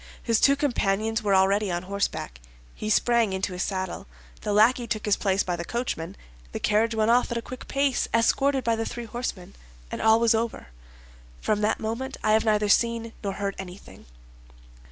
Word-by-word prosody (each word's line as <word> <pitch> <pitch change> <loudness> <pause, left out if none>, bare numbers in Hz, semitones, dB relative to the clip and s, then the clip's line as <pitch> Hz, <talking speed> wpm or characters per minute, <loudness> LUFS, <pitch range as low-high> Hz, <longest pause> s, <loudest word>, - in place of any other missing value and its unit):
His 230 -2 +2
two 280 - +5
companions 225 -5 0
were 200 -2 +2
already 195 +2 +3
on 175 0 -2
horseback. 190 - -3 0.3
He 215 - -5
sprang 230 -1 +3
into 190 0 -2
his 180 - -4
saddle; 185 - -3 0.3
the 210 - -2
lackey 235 +4 +4
took 215 -2 -3
his 210 -2 +3
place 195 -1 +1
by 180 - -2
the 170 - -5
coachman; 195 -5 -4 0.4
the - - -3
carriage 220 +2 +1
went 220 +1 +2
off 245 +1 +3
at 235 - -1
a - - -2
quick 255 - -9
pace, 275 -2 +1
escorted 265 +4 +2
by 230 -1 +1
the 225 0 -2
three 240 -1 -6
horsemen, 225 -6 -5 0.4
and - - -4
all 220 0 +5
was 230 -1 +4
over. 225 - -2 0.7
From 210 -1 0
that 210 +1 +1
moment 235 +5 -4
I 215 - +2
have 220 +1 +3
neither 210 -1 +2
seen 230 +2 +1
nor 200 -1 -2
heard 200 0 -3
anything." 190 - -11
220 Hz, 190 wpm, -26 LUFS, 195-235 Hz, 0.7 s, two